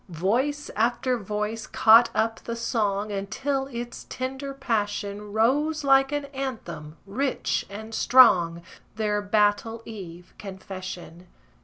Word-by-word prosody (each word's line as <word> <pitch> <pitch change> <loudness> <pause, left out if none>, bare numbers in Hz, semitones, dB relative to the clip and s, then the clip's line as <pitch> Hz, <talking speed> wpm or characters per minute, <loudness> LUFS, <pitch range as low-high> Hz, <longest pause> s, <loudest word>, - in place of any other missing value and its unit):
Voice 240 - -1
after 245 +3 +1
voice 210 +2 -3
caught 230 +2 +6
up 225 0 0
the 230 - -5
song, 210 -3 -1
Until 265 +8 -2
its 240 -2 -7
tender 265 +2 -4
passion 205 -5 -3
Rose 285 +8 +1
like 270 0 +4
an 290 -1 -2
anthem, 220 - -6
rich 260 +7 -1
and 220 +2 -8
strong, 175 -11 +5 0.3
Their 210 -1 0
battle 210 +2 +1
eve 180 -6 -10
confession. 185 -3 -8
220 Hz, 115 wpm, -25 LUFS, 200-260 Hz, 0.3 s, caught